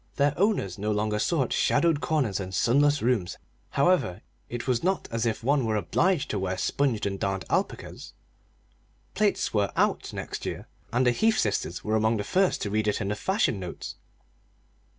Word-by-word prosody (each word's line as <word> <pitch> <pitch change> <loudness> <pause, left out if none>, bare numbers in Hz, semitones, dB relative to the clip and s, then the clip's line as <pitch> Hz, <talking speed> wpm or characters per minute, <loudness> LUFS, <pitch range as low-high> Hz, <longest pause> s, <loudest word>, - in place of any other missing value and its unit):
Their 145 0 +2
owners 190 - 0
no 105 +2 -1
longer 105 0 0
sought 135 -1 +1
shadowed 165 -4 +2
corners 125 -8 0
and 95 -1 -5
sunless 145 +3 +3
rooms, 115 -7 0 0.3
however; 140 - +2 0.3
it 120 +2 -5
was 125 -3 +1
not 190 +1 0
as 115 0 0
if 110 0 -2
one 140 +2 +2
were 110 -1 0
obliged 170 - +1
to 105 - -1
wear 95 0 -2
sponged 135 -6 0
and 100 -1 -2
darned 95 -1 -2
alpacas! - - -3 1.0
Plaits 210 -1 +1
were 105 -2 +1
"out" - - +1
next - - -6
year, - - -5 0.2
and 125 +2 +2
the 125 - +5
Heath 220 - +2
sisters 100 -4 -1
were 110 +1 0
among 110 +1 +2
the 105 - -2
first 185 - +1
to 100 - -3
read 110 0 0
it 105 - +1
in 100 - -2
the 105 - -1
fashion 190 - 0
notes. 90 -2 -6
115 Hz, 180 wpm, -27 LUFS, 105-145 Hz, 1.0 s, the